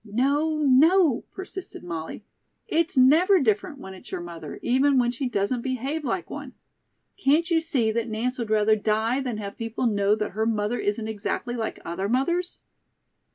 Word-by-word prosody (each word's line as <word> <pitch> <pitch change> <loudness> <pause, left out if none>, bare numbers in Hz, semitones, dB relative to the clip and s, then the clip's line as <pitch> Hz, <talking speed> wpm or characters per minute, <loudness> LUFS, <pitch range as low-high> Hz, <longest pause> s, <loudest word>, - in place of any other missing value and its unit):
"No, 280 +8 +1
no," 300 +1 +4
persisted 380 - -8
Molly; 170 +3 -6 0.4
"it's 335 -4 0
never 330 +10 +6
different 225 +2 0
when 190 -7 -9
it's 185 - -13
your - - -3
mother, 170 -1 -8
even 265 +3 +3
when 240 -1 +3
she 255 +1 -3
doesn't 235 +3 -1
behave 265 +5 -3
like 290 +7 -2
one. - - -8 0.6
Can't 330 0 +2
you 325 -1 +3
see 270 -10 0
that 230 +1 -2
Nance 245 +4 -2
would 230 -3 -3
rather 215 0 +4
die 220 +4 0
than 250 -5 -3
have 200 -2 -7
people 230 +2 -3
know 205 -2 +2
that 210 -1 -3
her 220 +3 -1
mother 215 +1 0
isn't 215 +2 -1
exactly 220 +3 -3
like 225 -2 -4
other 190 +4 -3
mothers?" 345 +9 0
240 Hz, 170 wpm, -25 LUFS, 215-285 Hz, 0.6 s, never